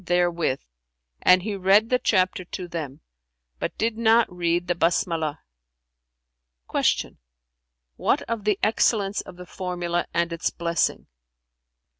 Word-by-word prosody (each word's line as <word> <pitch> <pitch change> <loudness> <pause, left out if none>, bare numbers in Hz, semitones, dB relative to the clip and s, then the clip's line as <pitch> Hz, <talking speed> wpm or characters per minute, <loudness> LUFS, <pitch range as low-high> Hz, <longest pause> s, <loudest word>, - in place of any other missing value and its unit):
therewith, 175 -5 +1 0.6
and 180 0 +5
he 210 0 -3
read 195 +4 +3
the 250 - +3
chapter 185 -4 +1
to 180 0 -7
them, 155 -4 -6 0.6
but - - -4
did 225 0 -1
not 230 0 +4
read 175 0 0
the 175 - +2
Basmalah."[FN#369] 60 - -3
Q - - -7 0.8
"What - - +1
of 230 -2 -4
the 210 -1 +1
excellence 210 -2 +2
of 180 - -12
the 180 - -9
formula 175 -1 -3
and 170 0 0
its 170 - -1
blessing?" 170 -1 -1
175 Hz, 125 wpm, -24 LUFS, 155-195 Hz, 0.8 s, and